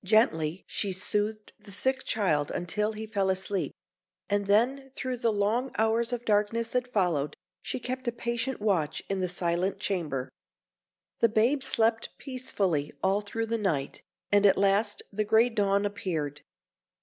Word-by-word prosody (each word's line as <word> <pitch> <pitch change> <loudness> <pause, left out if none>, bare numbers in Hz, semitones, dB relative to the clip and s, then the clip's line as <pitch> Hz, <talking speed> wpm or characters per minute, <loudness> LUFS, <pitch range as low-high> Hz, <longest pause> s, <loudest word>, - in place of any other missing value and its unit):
Gently 185 -5 +2
she 200 -3 -2
soothed 210 +3 -2
the 200 - -14
sick 260 +7 +1
child 155 -9 +1
until 210 +5 -1
he 215 +1 -5
fell 200 -3 0
asleep; 190 0 -1 0.6
and 205 -1 +1
then, 255 +7 +2
through 255 -1 -3
the 230 -1 +1
long 215 +5 +1
hours 225 +2 +2
of 240 -1 -3
darkness 215 +2 +1
that 250 0 -1
followed, 165 - +1 0.3
she - - -3
kept 255 +1 -4
a - - +2
patient 235 +2 -2
watch 185 -8 0
in 195 - 0
the 185 -1 0
silent 175 +2 0
chamber. 160 -10 -2 0.9
The 230 - +5
babe 235 +6 +2
slept 230 -3 +1
peacefully 200 - -1
all 195 +2 +3
through 225 +2 -3
the 230 0 -1
night, 155 -10 -1 0.3
and 205 0 +5
at 195 - +4
last 200 +2 +2
the 215 +2 +1
grey 220 +3 +4
dawn 200 -3 +1
appeared. 165 -9 -3
205 Hz, 155 wpm, -28 LUFS, 190-230 Hz, 0.9 s, The